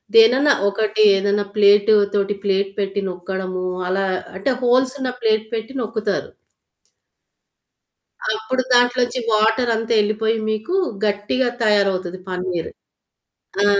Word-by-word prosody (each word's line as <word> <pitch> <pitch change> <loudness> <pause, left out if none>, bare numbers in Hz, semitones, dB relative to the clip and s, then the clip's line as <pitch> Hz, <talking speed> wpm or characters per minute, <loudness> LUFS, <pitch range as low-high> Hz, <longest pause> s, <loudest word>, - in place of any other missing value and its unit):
దేనైనా 295 -11 +6 0.2
ఒకటి 215 +1 -1
ఏదన్నా 205 +1 0
ప్లేట్‌తో 205 0 +4 0.2
ప్లేట్ 195 0 0
పెట్టి 200 0 -2
నొక్కడము 185 0 -5 0.2
అలా 195 +2 0 0.3
అంటే 195 +8 -1
హోల్స్ 255 +1 +3
ఉన్న 260 -1 -2
ప్లేట్ 220 -1 +1
పెట్టి 225 +3 -4
నొక్కుతారు. 215 -3 -3 2.1
అప్పుడు 255 +4 -2
దాంట్లోంచి 245 +1 +2
వాటరంతా 225 +1 +1
వెళ్ళిపోయి 215 +2 0
మీకు 220 +10 -3 0.3
గట్టిగా 210 +5 0 0.2
తయారవుతది 195 -3 +1
పన్నీర్. 180 -2 -3 0.9
ఆ - - +4
215 Hz, 100 wpm, -20 LUFS, 195-230 Hz, 2.1 s, దేనైనా